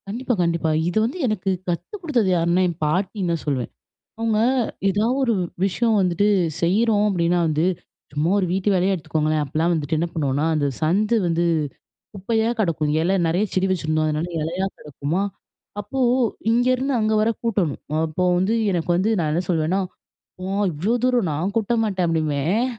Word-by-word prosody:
கண்டிப்பா, 245 Hz, +5 st, -2 dB
கண்டிப்பா. 170 Hz, -1 st, 0 dB, 0.2 s
இது 180 Hz, -, -3 dB
வந்து 250 Hz, +10 st, -3 dB
எனக்கு 205 Hz, -3 st, -1 dB, 0.2 s
கத்து 175 Hz, -, -3 dB
கொடுத்தது 255 Hz, -, +1 dB
யாருன்னா, 170 Hz, +2 st, +2 dB
என் 170 Hz, -3 st, -4 dB
பாட்டின்னு 185 Hz, +3 st, -1 dB
தான் 165 Hz, -, -3 dB
சொல்வேன். 130 Hz, -5 st, -1 dB, 0.5 s
அவுங்க 225 Hz, -1 st, +1 dB, 0.5 s
எதா 205 Hz, +3 st, +1 dB, 0.2 s
ஒரு 240 Hz, -3 st, +2 dB, 0.3 s
விஷயம் 220 Hz, +4 st, +1 dB
வந்துட்டு 185 Hz, +2 st, +2 dB, 0.3 s
செய்றோம் 210 Hz, +4 st, +2 dB
அப்பிடின்னா 175 Hz, -2 st, +1 dB
வந்து, 155 Hz, +1 st, +1 dB, 0.5 s
சும்மா 150 Hz, +3 st, 0 dB
ஒரு 190 Hz, -, +1 dB
வீட்டு 190 Hz, +2 st, 0 dB
வேலைய 190 Hz, +1 st, +2 dB
எடுத்துக்கோங்களேன்! 155 Hz, -2 st, -1 dB
அப்புட்லாம் 160 Hz, +5 st, 0 dB
வந்துட்டு 160 Hz, -1 st, -1 dB
என்ன 170 Hz, -, 0 dB
பண்ணுவோன்னா, 145 Hz, -1 st, 0 dB
அந்த 150 Hz, -2 st, +1 dB
சந்து 205 Hz, +8 st, +2 dB
வந்து 170 Hz, 0 st, +1 dB, 0.7 s
குப்பையா 220 Hz, +3 st, 0 dB
கிடக்கும். 160 Hz, -6 st, 0 dB
இல 185 Hz, +4 st, +2 dB
நிறைய 175 Hz, +5 st, +1 dB
செடி 185 Hz, 0 st, +2 dB
வச்சுருந்தோம், 155 Hz, -3 st, 0 dB
அதனால 155 Hz, +3 st, -1 dB
இலையா 175 Hz, +5 st, -2 dB
கிடக்குமா! 150 Hz, +5 st, -3 dB, 0.6 s
அப்போ 205 Hz, +6 st, -6 dB, 0.5 s
இங்கேருந்து 255 Hz, +3 st, +2 dB
அங்கே 215 Hz, 0 st, +1 dB
வர 220 Hz, +1 st, +2 dB
கூட்டணும். 200 Hz, -, 0 dB, 0.3 s
அப்போ 160 Hz, +3 st, -3 dB, 0.2 s
வந்து 190 Hz, +4 st, +1 dB, 0.2 s
எனக்கு 175 Hz, -3 st, -2 dB
வந்து 190 Hz, +4 st, +1 dB
நான் 155 Hz, -3 st, 0 dB
என்ன 170 Hz, +3 st, 0 dB
சொல்லுவேன்னா, 170 Hz, +2 st, +1 dB, 0.6 s
"ஓ! -, -, -4 dB, 0.3 s
இவ்ளோ 175 Hz, +9 st, -1 dB
தூரம் 245 Hz, -8 st, +2 dB
நான் 170 Hz, +7 st, -2 dB
கூட்ட 225 Hz, +1 st, 0 dB
மாட்டேன்" 190 Hz, -4 st, 0 dB
அப்பிடிம்பேன். 160 Hz, -, 0 dB
180 Hz, 160 wpm, -22 LUFS, 160-210 Hz, 0.7 s, யாருன்னா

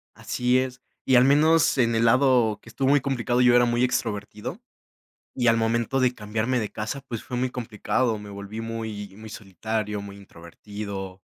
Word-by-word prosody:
Así 125 Hz, +1 st, +1 dB
es, 130 Hz, -1 st, -4 dB, 0.2 s
y 130 Hz, -, +4 dB
al 125 Hz, -, +7 dB
menos 150 Hz, +3 st, +4 dB
en 115 Hz, -1 st, +3 dB
el 115 Hz, -, +2 dB
lado 120 Hz, -3 st, +3 dB
que -, -, -15 dB
estuvo 135 Hz, +3 st, -1 dB
muy 145 Hz, -1 st, +4 dB
complicado, 125 Hz, -2 st, 0 dB
yo 125 Hz, -1 st, +5 dB
era 120 Hz, 0 st, +5 dB
muy 120 Hz, +1 st, +1 dB
extrovertido, 115 Hz, -, -3 dB, 0.8 s
y 120 Hz, -2 st, +1 dB
al 115 Hz, -, +5 dB
momento 115 Hz, +3 st, 0 dB
de 125 Hz, -1 st, +2 dB
cambiarme 110 Hz, +3 st, -1 dB
de 105 Hz, -, -3 dB
casa, 110 Hz, +6 st, -4 dB
pues, 115 Hz, -2 st, -5 dB
fue 125 Hz, -, -5 dB
muy 125 Hz, +1 st, 0 dB
complicado, 115 Hz, 0 st, -1 dB
me 105 Hz, 0 st, -10 dB
volví 100 Hz, +2 st, -7 dB
muy, 110 Hz, -3 st, -5 dB
muy 110 Hz, +1 st, -10 dB
solitario, 105 Hz, +1 st, -4 dB
muy 100 Hz, 0 st, -9 dB
introvertido, 95 Hz, +1 st, -8 dB
115 Hz, 180 wpm, -25 LUFS, 105-125 Hz, 0.8 s, al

